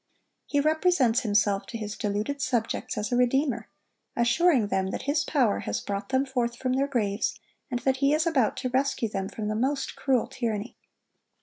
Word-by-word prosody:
He 285 Hz, -, +1 dB
represents 310 Hz, -5 st, +3 dB
himself 205 Hz, -3 st, +1 dB
to 230 Hz, -, -5 dB
his 210 Hz, -2 st, -5 dB
deluded 210 Hz, +7 st, -2 dB
subjects 240 Hz, -5 st, -1 dB
as 210 Hz, +2 st, -2 dB
a -, -, +2 dB
redeemer, 250 Hz, -1 st, +1 dB, 0.5 s
assuring 240 Hz, -, +3 dB
them 190 Hz, -1 st, 0 dB
that -, -, -4 dB
his 285 Hz, +2 st, +1 dB
power 255 Hz, -9 st, +2 dB
has -, -, -2 dB
brought 200 Hz, +3 st, -4 dB
them 265 Hz, +1 st, +2 dB
forth 245 Hz, -3 st, -1 dB
from 255 Hz, +1 st, -1 dB
their 275 Hz, +2 st, +1 dB
graves, 215 Hz, -6 st, -1 dB, 0.3 s
and 245 Hz, -1 st, -2 dB
that 265 Hz, -1 st, +1 dB
he 275 Hz, +1 st, +3 dB
is 310 Hz, +2 st, +2 dB
about 270 Hz, -10 st, +2 dB
to 255 Hz, -, -2 dB
rescue 260 Hz, -3 st, 0 dB
them 195 Hz, -2 st, -3 dB
from 215 Hz, -1 st, -5 dB
the 215 Hz, -, -1 dB
most 270 Hz, +5 st, -1 dB
cruel 260 Hz, -4 st, +1 dB
tyranny. 225 Hz, -1 st, -3 dB
245 Hz, 185 wpm, -27 LUFS, 215-275 Hz, 0.5 s, represents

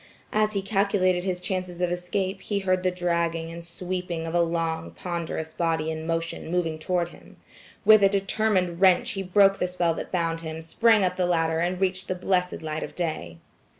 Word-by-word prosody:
As 215 Hz, 0 st, +2 dB
he 200 Hz, -2 st, -1 dB
calculated 195 Hz, -3 st, +1 dB
his 185 Hz, -2 st, -1 dB
chances 180 Hz, -1 st, -4 dB
of 180 Hz, -1 st, +1 dB
escape, 185 Hz, +2 st, -2 dB
he 205 Hz, +1 st, -2 dB
heard 185 Hz, -2 st, +1 dB
the 185 Hz, -, +2 dB
dragging 170 Hz, -2 st, -1 dB
and 170 Hz, 0 st, -8 dB
sweeping 175 Hz, -1 st, -4 dB
of 165 Hz, -, -4 dB
a 175 Hz, -, +4 dB
long 165 Hz, -1 st, -1 dB
ponderous 165 Hz, -2 st, -4 dB
body 160 Hz, -2 st, 0 dB
in 160 Hz, 0 st, -5 dB
motion 165 Hz, -1 st, -3 dB
moving 165 Hz, -2 st, -1 dB
toward 175 Hz, +1 st, 0 dB
him. -, -, -16 dB, 0.5 s
With 215 Hz, -1 st, +8 dB
a 195 Hz, -, +6 dB
determined 195 Hz, -3 st, 0 dB
wrench 185 Hz, -2 st, +5 dB
he 195 Hz, -, -3 dB
broke 195 Hz, +1 st, +4 dB
the 180 Hz, -, +1 dB
spell 180 Hz, -2 st, 0 dB
that -, -, -6 dB
bound 165 Hz, -2 st, -1 dB
him, 160 Hz, 0 st, -6 dB
sprang 220 Hz, +5 st, +3 dB
up 180 Hz, 0 st, 0 dB
the 180 Hz, -1 st, +1 dB
ladder 165 Hz, -2 st, +1 dB
and 180 Hz, +2 st, 0 dB
reached 190 Hz, 0 st, -1 dB
the 185 Hz, -, -1 dB
blessed 180 Hz, -2 st, 0 dB
light 155 Hz, 0 st, -3 dB
of -, -, -6 dB
day. 155 Hz, -, -3 dB
180 Hz, 195 wpm, -26 LUFS, 165-185 Hz, 0.5 s, With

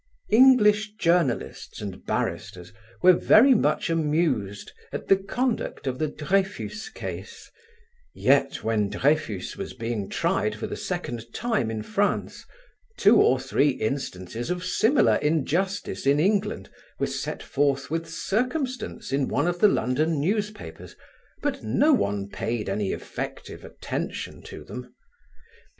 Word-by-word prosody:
English 215 Hz, -3 st, +5 dB
journalists 165 Hz, -, 0 dB
and 100 Hz, -3 st, -7 dB
barristers 90 Hz, +1 st, -3 dB, 0.3 s
were 185 Hz, 0 st, +8 dB
very 245 Hz, +9 st, +6 dB
much 225 Hz, -, +1 dB
amused 150 Hz, -, 0 dB, 0.2 s
at -, -, -5 dB
the 195 Hz, -, +6 dB
conduct 225 Hz, -, -2 dB
of 130 Hz, -1 st, -2 dB
the 155 Hz, -, +1 dB
Dreyfus 195 Hz, +7 st, -2 dB
case; -, -, -8 dB, 0.6 s
yet, -, -, +2 dB
when 110 Hz, -3 st, +1 dB
Dreyfus 140 Hz, -10 st, 0 dB
was -, -, -6 dB
being 115 Hz, -4 st, -3 dB
tried -, -, 0 dB
for -, -, -5 dB
the -, -, -4 dB
second 115 Hz, -1 st, -5 dB
time 220 Hz, -, 0 dB
in 110 Hz, -1 st, -4 dB
France, 205 Hz, -1 st, -1 dB, 0.5 s
two 205 Hz, +4 st, +6 dB
or 130 Hz, -, +4 dB
three 135 Hz, +2 st, +2 dB
instances 115 Hz, -, -3 dB
of 180 Hz, 0 st, -2 dB
similar 225 Hz, +9 st, +3 dB
injustice 165 Hz, +3 st, -1 dB
in 140 Hz, +1 st, +4 dB
England 200 Hz, -, 0 dB, 0.3 s
were -, -, 0 dB
set -, -, -4 dB
forth 140 Hz, 0 st, 0 dB
with 165 Hz, 0 st, -2 dB
circumstance 255 Hz, -, -2 dB
in 135 Hz, -1 st, +1 dB
one 145 Hz, -, 0 dB
of 175 Hz, 0 st, -1 dB
the 210 Hz, -, +7 dB
London 150 Hz, +3 st, +1 dB
newspapers, 210 Hz, +6 st, -3 dB, 0.5 s
but 280 Hz, -2 st, -1 dB
no 300 Hz, +2 st, +3 dB
one 100 Hz, -, 0 dB
paid 115 Hz, +2 st, -3 dB
any 100 Hz, 0 st, -1 dB
effective -, -, -6 dB
attention -, -, -5 dB
to -, -, -10 dB
them. 125 Hz, 0 st, -9 dB
155 Hz, 130 wpm, -25 LUFS, -, 0.6 s, were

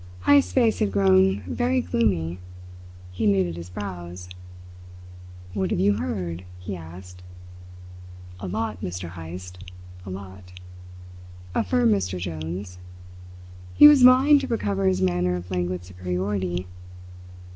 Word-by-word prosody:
Heyst's 285 Hz, -1 st, +5 dB
face 235 Hz, -4 st, +2 dB
had 100 Hz, -, +1 dB
grown 95 Hz, 0 st, +3 dB
very 245 Hz, -, 0 dB
gloomy. 90 Hz, -, 0 dB, 0.7 s
He 100 Hz, +4 st, -1 dB
knitted 95 Hz, -4 st, +1 dB
his 85 Hz, +1 st, -8 dB
brows. 90 Hz, -2 st, -7 dB, 1.2 s
"What 95 Hz, -1 st, -1 dB
have -, -, -1 dB
you 100 Hz, +2 st, +3 dB
heard?" 85 Hz, 0 st, -4 dB
he 95 Hz, +2 st, -6 dB
asked. 90 Hz, +2 st, -11 dB, 1.2 s
"A 95 Hz, -, -6 dB
lot, 105 Hz, +4 st, -3 dB
Mr. 90 Hz, -1 st, -5 dB
Heyst 90 Hz, +2 st, -9 dB, 0.4 s
a 95 Hz, -, -9 dB
lot," 95 Hz, -1 st, -10 dB, 1.0 s
affirmed 115 Hz, +3 st, +2 dB
Mr. 95 Hz, -2 st, -2 dB
Jones. 90 Hz, +2 st, -6 dB, 1.0 s
He 295 Hz, -, +10 dB
was 295 Hz, -3 st, +7 dB
vying 260 Hz, +4 st, +7 dB
to 275 Hz, -, -4 dB
recover 100 Hz, -, -1 dB
his 95 Hz, 0 st, +1 dB
manner 90 Hz, 0 st, +1 dB
of 90 Hz, +1 st, -7 dB
languid 90 Hz, 0 st, -2 dB
superiority. 90 Hz, 0 st, -3 dB
95 Hz, 120 wpm, -24 LUFS, 90-100 Hz, 1.2 s, He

